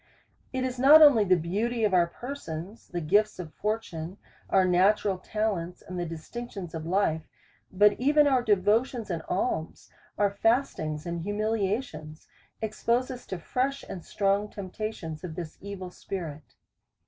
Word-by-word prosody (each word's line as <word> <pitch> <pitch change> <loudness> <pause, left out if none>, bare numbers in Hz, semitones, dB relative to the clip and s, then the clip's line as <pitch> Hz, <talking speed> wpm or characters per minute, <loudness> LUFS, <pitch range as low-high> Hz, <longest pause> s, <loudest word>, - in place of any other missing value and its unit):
It 260 -1 -2
is 255 -1 -3
not 300 +4 +9
only 270 -8 +7
the 185 -2 +4
beauty 210 +8 -1
of 205 -3 +2
our 175 -2 +5
persons, 200 - -7
the 175 -1 -4
gifts 205 +7 +2
of 165 -4 -7
fortune, 200 -5 -3 0.3
or 195 - +5
our - - +3
natural 190 +2 +3
talents, 190 -4 -2
and 180 0 -6
the 175 - -2
distinctions 180 +3 -7
of 160 -1 -5
life; 165 -4 0 0.4
but 205 +2 +5
even 295 +3 +4
our 265 -3 +4
devotions 215 +2 +1
and 165 -2 -2
alms, 165 -5 -2 0.3
our 205 -1 +3
fastings 200 - 0
and 170 -1 -3
humiliations, 205 -5 -2 0.4
expose 235 +4 0
us 250 -1 -9
to 190 - -4
fresh 260 - -2
and 180 - -6
^strong 200 +3 0
temp 190 -3 -8
tations 170 -8 -5
of 170 -3 -6
this 165 -3 -7
evil 190 -2 -7
spirit. 160 -6 -7
200 Hz, 155 wpm, -28 LUFS, 170-225 Hz, 0.4 s, not